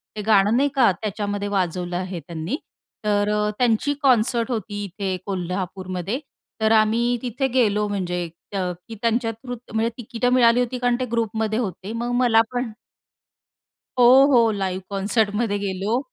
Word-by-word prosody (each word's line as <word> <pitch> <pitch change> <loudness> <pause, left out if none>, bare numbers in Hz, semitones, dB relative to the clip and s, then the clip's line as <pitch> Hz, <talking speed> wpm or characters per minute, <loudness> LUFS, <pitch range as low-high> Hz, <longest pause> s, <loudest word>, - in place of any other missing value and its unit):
ते 210 - -3
गाणं 215 +1 +4
नाही 285 +2 +3
का. 250 -6 +5
त्याच्यामध्ये 205 -1 -3
वाजवलं 180 -3 -1
आहे 185 -1 -4
त्यांनी. 170 - -4 0.5
तर 205 0 +2
अ, 210 0 +1
त्यांची 245 +4 +2
कॉन्सर्ट 240 -2 +3
होती 205 -2 -3
इथे 195 0 -3
कोल्हापूरमध्ये. 185 +2 -3 0.4
तर 220 0 +3
आम्ही 230 +3 +3
तिथे 250 +2 -1
गेलो 210 -5 +2
म्हणजे 180 -3 -2 0.3
अ, 195 - 0 0.3
की 225 - -8
त्यांच्या 230 0 +1
थ्रूच 245 +1 -8
म्हणजे 225 +1 +1
तिकिटं 245 +1 -1
मिळाली 240 -1 +5
होती 250 +1 -1
कारण 245 -1 +2
ते 255 - 0
ग्रुपमध्ये 220 -1 0
होते. 195 -2 -4
मग 240 +1 -3
मला 235 -3 +5
पण 245 -2 -2 1.3
हो, 255 +2 +7
हो 230 -3 +5
लाईव्ह 190 -2 -2
कॉन्सर्टमध्ये 205 +1 0
गेलो. 200 +4 -1
215 Hz, 150 wpm, -23 LUFS, 195-240 Hz, 1.3 s, हो